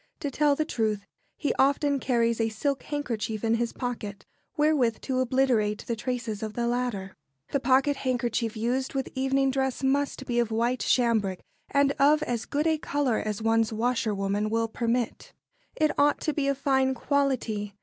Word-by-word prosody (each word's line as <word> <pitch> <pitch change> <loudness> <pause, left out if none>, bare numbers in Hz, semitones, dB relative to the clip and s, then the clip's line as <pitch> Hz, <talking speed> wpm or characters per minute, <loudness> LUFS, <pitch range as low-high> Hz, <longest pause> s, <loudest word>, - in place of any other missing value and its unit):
To 285 - -2
tell 290 +1 +3
the 310 - 0
truth, 215 -7 -1 0.3
he 290 - 0
often 280 +1 +3
carries 235 -3 +1
a 225 - +1
silk 270 +6 -2
handkerchief 230 -7 -3
in 225 0 +2
his 230 0 0
pocket 225 -5 -5 0.3
wherewith 295 -7 +2
to 260 -2 -1
obliterate 245 -5 +1
the 235 - -2
traces 230 -2 -3
of 215 -1 -4
the 240 +1 -1
latter. 235 -6 -2 0.4
The 280 - +1
pocket 270 +2 +3
handkerchief 240 -3 -1
used 255 +5 -1
with 270 -1 -2
evening 270 +1 +1
dress 265 0 -1
must 275 0 0
be 240 -1 0
of 235 -2 +1
white 235 +3 0
cambric, 220 -7 +2 0.3
and 280 0 +3
of 295 +2 +5
as 235 -2 -2
good 295 +2 -1
a 320 -1 +2
colour 280 -6 0
as 215 0 -3
one's 225 0 +2
washerwoman 215 -3 0
will 225 +1 +1
permit. 235 +1 -2 0.4
It 310 -1 +2
ought 290 +1 +4
to 310 - 0
be 285 -2 0
of 275 -1 +1
fine 265 -1 +2
quality. 240 -8 -1
245 Hz, 170 wpm, -27 LUFS, 225-275 Hz, 0.4 s, of